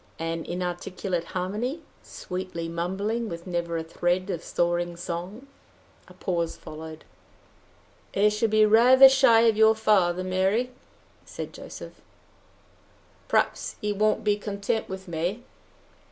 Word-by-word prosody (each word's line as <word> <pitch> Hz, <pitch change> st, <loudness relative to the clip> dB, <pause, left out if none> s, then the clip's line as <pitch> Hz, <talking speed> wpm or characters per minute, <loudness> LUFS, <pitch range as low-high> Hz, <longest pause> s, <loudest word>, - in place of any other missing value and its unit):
An 165 Hz, 0 st, -3 dB
inarticulate 180 Hz, 0 st, -3 dB
harmony 210 Hz, -, -3 dB, 0.2 s
sweetly 180 Hz, -2 st, -6 dB
mumbling, 195 Hz, +7 st, -2 dB
with 170 Hz, -1 st, -7 dB
never 170 Hz, -2 st, -2 dB
a 165 Hz, -, -3 dB
thread 175 Hz, +3 st, -1 dB
of 170 Hz, -3 st, -4 dB
soaring 175 Hz, 0 st, -1 dB
song!" 180 Hz, +8 st, -6 dB, 0.6 s
A -, -, -16 dB
pause 170 Hz, -3 st, -2 dB
followed. 155 Hz, 0 st, -10 dB, 1.1 s
"I 205 Hz, +2 st, +4 dB
shall 210 Hz, +2 st, 0 dB
be 215 Hz, 0 st, +5 dB
rather 250 Hz, +5 st, +8 dB
shy 265 Hz, -4 st, +5 dB
of 230 Hz, -2 st, +4 dB
your 220 Hz, 0 st, +6 dB
father, 185 Hz, -5 st, +2 dB
Mary," 190 Hz, +7 st, 0 dB, 0.5 s
said -, -, -8 dB
Joseph. -, -, -10 dB, 1.3 s
"Perhaps -, -, 0 dB
he 210 Hz, 0 st, -1 dB
won't 215 Hz, +2 st, +1 dB
be 205 Hz, -1 st, +2 dB
content 205 Hz, +1 st, -3 dB
with 190 Hz, 0 st, -7 dB
me." 175 Hz, +8 st, -3 dB
190 Hz, 125 wpm, -26 LUFS, 175-215 Hz, 1.3 s, rather